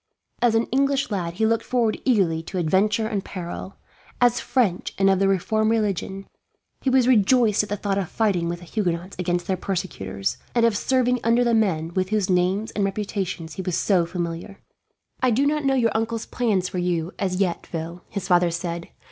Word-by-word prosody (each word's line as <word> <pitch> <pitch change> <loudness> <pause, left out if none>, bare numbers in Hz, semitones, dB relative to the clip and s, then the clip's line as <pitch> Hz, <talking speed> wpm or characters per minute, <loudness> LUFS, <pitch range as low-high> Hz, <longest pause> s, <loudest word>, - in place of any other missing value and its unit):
As 235 -2 +3
an 225 - +3
English 275 0 +1
lad, 175 -4 -2
he 220 - +1
looked 225 0 +1
forward 235 -4 0
eagerly 190 -11 +2
to 185 +3 -6
adventure 195 +6 +2
and 210 -3 -2
peril; 185 +1 -7 0.4
as 245 -1 +4
French 225 -10 0
and 195 0 +4
of 190 - +2
the 195 - +3
reformed 215 +3 +1
religion, 195 -3 -1 0.6
he 270 - +1
was 255 -1 +4
rejoiced 230 -2 +4
at 210 - -6
the 205 - -2
thought 200 0 -1
of 185 - -3
fighting 190 -7 0
with 175 - -3
the - - -11
Huguenots 175 -1 -2
against 175 -1 -1
their 190 - -1
persecutors, 180 - -3 0.2
and 235 -1 +4
of 230 -2 +2
serving 250 +2 +1
under 235 +2 +3
the 235 -1 +2
men 175 -7 +1
with 185 0 0
whose 210 -3 +1
names 185 +5 +1
and 205 - -1
reputations 195 -4 -3
he - - -5
was 180 -1 -1
so 180 -4 +2
familiar. 175 +2 -5 0.6
"I 255 - +4
do 250 +5 +2
not 300 0 0
know 270 0 +3
your 230 -4 +2
uncle's 225 0 -1
plans 205 -7 0
for 180 - -4
you, 175 0 -1
as 185 -2 0
yet, 185 -2 -1
Phil," 170 +1 -5
his 200 -3 -4
father 175 -1 +4
said. 170 0 -4
195 Hz, 200 wpm, -23 LUFS, 180-225 Hz, 0.6 s, as